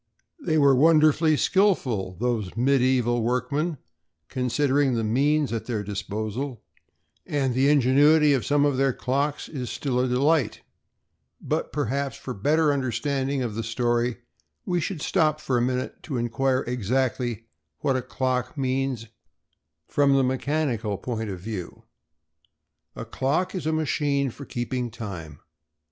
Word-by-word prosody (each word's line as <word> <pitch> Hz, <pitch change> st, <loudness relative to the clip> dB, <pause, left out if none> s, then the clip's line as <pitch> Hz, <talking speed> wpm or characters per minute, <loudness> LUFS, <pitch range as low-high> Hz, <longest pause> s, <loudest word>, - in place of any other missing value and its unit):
They 160 Hz, -, 0 dB
were 140 Hz, -2 st, +5 dB
wonderfully 155 Hz, +2 st, +4 dB
skilful, 125 Hz, -, +1 dB
those 115 Hz, -5 st, -2 dB
medieval 125 Hz, -2 st, +2 dB
workmen, 140 Hz, +7 st, -1 dB, 0.5 s
considering 135 Hz, +1 st, +1 dB
the 115 Hz, -, 0 dB
means 140 Hz, +5 st, +1 dB
at 115 Hz, -, -4 dB
their 110 Hz, -4 st, -2 dB
disposal, 110 Hz, +5 st, -4 dB, 0.6 s
and 135 Hz, -3 st, -1 dB
the 135 Hz, +3 st, +3 dB
ingenuity 145 Hz, +2 st, +5 dB
of 130 Hz, -, +1 dB
some 145 Hz, 0 st, +2 dB
of 145 Hz, -3 st, +1 dB
their 135 Hz, -1 st, +2 dB
clocks 140 Hz, +4 st, -1 dB
is 130 Hz, -6 st, -5 dB
still 130 Hz, -3 st, -2 dB
a 130 Hz, -, +2 dB
delight, 135 Hz, +1 st, +1 dB, 0.8 s
but, -, -, -2 dB
perhaps, 140 Hz, +3 st, -2 dB
for 125 Hz, -, -6 dB
better 150 Hz, +8 st, +2 dB
understanding 135 Hz, 0 st, -1 dB
of 115 Hz, -3 st, -3 dB
the 115 Hz, -, -3 dB
story, 120 Hz, +1 st, 0 dB, 0.5 s
we 175 Hz, -2 st, 0 dB
should 160 Hz, -2 st, -4 dB
stop 155 Hz, -1 st, +2 dB
for 130 Hz, -, -1 dB
a 120 Hz, -, +2 dB
minute 125 Hz, +1 st, -2 dB
to 140 Hz, -6 st, -4 dB
inquire 130 Hz, +3 st, 0 dB
exactly 125 Hz, -1 st, -1 dB, 0.4 s
what 135 Hz, -, +1 dB
a 130 Hz, -, 0 dB
clock 130 Hz, +1 st, -2 dB
means 130 Hz, -3 st, -1 dB, 0.8 s
from 140 Hz, -1 st, +3 dB
the 135 Hz, -, +4 dB
mechanical 130 Hz, -5 st, -1 dB
point 110 Hz, 0 st, -4 dB
of 95 Hz, -2 st, -5 dB
view. 95 Hz, -2 st, -7 dB, 1.1 s
A -, -, -6 dB
clock 155 Hz, +8 st, -1 dB
is 185 Hz, -5 st, -3 dB
a -, -, +2 dB
machine 145 Hz, -3 st, 0 dB
for 140 Hz, -, -10 dB
keeping 125 Hz, 0 st, -3 dB
time. 90 Hz, -, -8 dB
130 Hz, 140 wpm, -25 LUFS, 120-145 Hz, 1.1 s, were